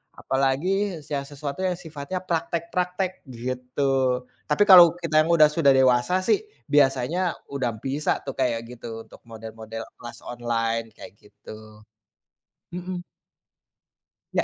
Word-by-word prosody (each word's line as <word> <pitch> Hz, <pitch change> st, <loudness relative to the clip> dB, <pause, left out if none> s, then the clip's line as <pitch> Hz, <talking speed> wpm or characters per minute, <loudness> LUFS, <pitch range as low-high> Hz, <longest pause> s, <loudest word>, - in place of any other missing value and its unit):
apalagi 165 Hz, +8 st, 0 dB
yang 140 Hz, -1 st, -1 dB
sesuatu 145 Hz, +2 st, -6 dB
yang 180 Hz, -1 st, 0 dB
sifatnya 160 Hz, +2 st, -5 dB
praktek-praktek 180 Hz, +2 st, -2 dB
gitu. 125 Hz, +1 st, -1 dB, 0.2 s
Tapi 150 Hz, +7 st, +4 dB
kalau 175 Hz, -4 st, +9 dB
kita 160 Hz, -3 st, +2 dB
yang 160 Hz, -, -1 dB
udah 155 Hz, -2 st, +7 dB
sudah 150 Hz, -2 st, +3 dB
dewasa 130 Hz, +6 st, +3 dB
sih 405 Hz, -, +3 dB, 0.3 s
biasanya 135 Hz, +3 st, +3 dB, 0.3 s
udah 130 Hz, -4 st, -1 dB
bisa 140 Hz, +3 st, -1 dB
tuh 135 Hz, -, -4 dB
kayak 120 Hz, -3 st, +1 dB
gitu 115 Hz, -2 st, -8 dB
untuk -, -, -17 dB
model-model 110 Hz, 0 st, -8 dB, 0.2 s
kelas 120 Hz, -1 st, -9 dB
online 115 Hz, -1 st, -2 dB
kayak 115 Hz, -, -11 dB
gitu, 105 Hz, +1 st, -14 dB, 0.9 s
mhm. 180 Hz, 0 st, -5 dB, 1.3 s
Ya. -, -, +2 dB
135 Hz, 120 wpm, -24 LUFS, 120-170 Hz, 1.3 s, kalau